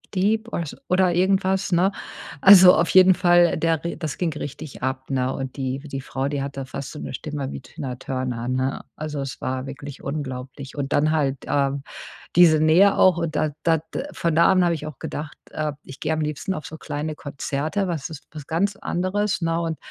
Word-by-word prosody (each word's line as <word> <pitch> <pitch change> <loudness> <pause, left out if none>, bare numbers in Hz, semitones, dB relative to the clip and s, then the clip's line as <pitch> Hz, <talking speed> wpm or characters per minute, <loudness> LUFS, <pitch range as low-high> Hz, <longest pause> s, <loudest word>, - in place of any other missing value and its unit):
Deep“ 215 +4 +1
oder 170 - -2
so 145 - -8
oder 180 -1 +3
irgendwas, 190 +1 +1
ne? 180 +3 +3 0.5
Also 185 -2 +10
auf 165 - +2
jeden 185 0 +7
Fall, 175 -1 +4
der 165 -1 0
ri 170 - -3
das 155 -4 -4
ging 170 -3 -1
richtig 145 0 -7
ab, 130 +1 -3
ne? 130 0 0
Und 135 -1 -5
die 130 -1 -2
die 140 -2 -6
Frau, 135 0 -3
die 145 -1 -2
hatte 135 -1 -5
fast 135 +1 -6
so - - -9
'ne - - -6
Stimme 145 -3 -4
wie - - -7
Tina 125 0 -6
Turner, 125 -2 -4
ne? 130 +1 -1
Also, 150 -1 -5
es 135 -2 -6
war 130 +1 -3
wirklich 140 +1 -8
unglaublich 135 -1 -6
und 140 -2 -3
dann 155 +2 +3
halt, 140 -4 +1
ähm, 140 -1 0 0.5
diese 165 -3 +7
Nähe 170 +6 +5
auch 185 -3 +5
und 165 -2 -2
da 155 -1 +1
da 165 -1 +4 0.2
d - - -2
äh, 275 - -4
von 170 -1 -1
da 170 +2 +5
an 185 -1 +4
habe 175 -1 +2
ich 155 -1 -5
auch 155 - -8
gedacht, 150 0 -6
äh, 155 -1 -2
ich 135 - -11
gehe 160 - -1
am 155 - -1
liebsten 150 +5 -2
auf 155 - -6
so 160 - -8
kleine 150 +2 -4
Konzerte, 150 +7 -3
was 160 -6 -3
ist 155 -3 -9
was 150 -3 -9
ganz 195 +5 0
anderes, 195 +3 -1
ne? 165 0 0
Und 165 -2 -2
155 Hz, 215 wpm, -23 LUFS, 135-175 Hz, 0.5 s, Also